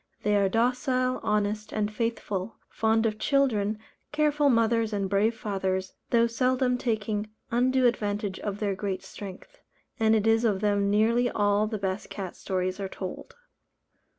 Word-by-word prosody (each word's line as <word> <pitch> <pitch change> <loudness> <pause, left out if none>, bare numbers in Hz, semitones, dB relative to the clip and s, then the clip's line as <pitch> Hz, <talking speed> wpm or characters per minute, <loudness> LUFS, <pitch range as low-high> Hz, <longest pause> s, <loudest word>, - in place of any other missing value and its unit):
They 210 0 +2
are 200 -1 +3
docile, 255 +3 +1
honest, 210 0 -1
and 210 0 -1
faithful, 220 -3 -3
fond 225 0 +1
of 215 -1 -1
children, 220 -7 +1 0.3
careful 295 -1 +2
mothers 230 -2 +2
and 200 -1 0
brave 205 +4 +2
fathers, 190 -3 -2 0.2
though 235 -1 +4
seldom 250 +2 +1
taking 215 -3 -1 0.2
undue 255 +2 +3
advantage 205 -4 0
of 205 -1 -4
their 205 -2 -1
great 190 0 -3
strength; 205 - -10 0.4
and 220 0 +4
it 215 -1 +1
is 225 +1 +3
of 210 -5 +2
them 205 -1 +1
nearly 230 +4 +3
all 205 0 +2
the 215 0 -3
best 190 0 -3
cat 190 -3 -6
stories 185 0 -2
are 195 -1 -3
told. 190 -1 -7
215 Hz, 150 wpm, -27 LUFS, 200-235 Hz, 0.4 s, though